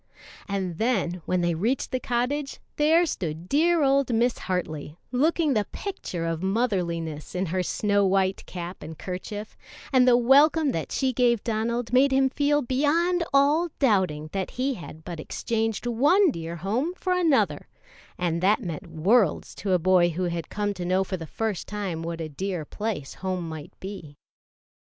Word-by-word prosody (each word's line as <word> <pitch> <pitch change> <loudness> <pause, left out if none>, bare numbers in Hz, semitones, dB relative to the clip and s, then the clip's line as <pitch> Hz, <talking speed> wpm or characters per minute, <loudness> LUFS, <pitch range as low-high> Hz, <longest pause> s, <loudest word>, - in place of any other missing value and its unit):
And 190 -4 -3
then 195 -7 0
when 185 -1 +1
they 175 0 +1
reached 225 +11 -1
the 255 - 0
cottage, 255 +4 -2 0.2
there 320 +4 +4
stood 170 - -4
dear 325 - +3
old 275 -2 +3
Mis, 235 +1 +1
Hartley, 160 -4 -4
looking 305 +3 +2
the 210 -4 0
picture 185 - -5
of 165 0 -2
motherliness 180 -8 -1
in 185 +1 0
her 185 +2 -1
snow 205 +2 +1
white 190 0 +1
cap 175 0 -7
and 155 0 -8
kerchief; 205 +5 -6 0.4
and 255 -1 +5
the 245 -1 +6
welcome 285 +4 +5
that 165 - -4
she 265 -2 0
gave 235 -3 +2
Donald 235 +1 -2
made 270 +2 +5
him 265 0 +3
feel 290 +1 +2
beyond 325 +8 +1
all 290 +5 +3
doubting 185 - +1
that 195 -1 -2
he 265 +2 -1
had 165 -6 -10
but 170 -2 -7
exchanged 225 +7 -2
one 295 - +4
dear 165 -4 -5
home 235 - -1
for 370 0 -1
another; 335 -6 +2 0.5
and 170 -1 -1
that 200 +3 +4
meant 165 -5 -5
worlds 195 +4 +2
to 195 -2 -2
a - - +5
boy 180 0 +4
who 175 +2 -3
had 170 -2 -3
come 205 0 -1
to 180 - -6
know 185 +2 +2
for 190 - -4
the 165 -3 -7
first 220 -1 -3
time 195 -6 -3
what 165 0 -4
a 160 - -3
dear 175 +1 -4
place 205 -7 -4
home 185 -2 -3
might 160 +2 -9
be. 185 -7 -8
205 Hz, 170 wpm, -26 LUFS, 175-260 Hz, 0.5 s, the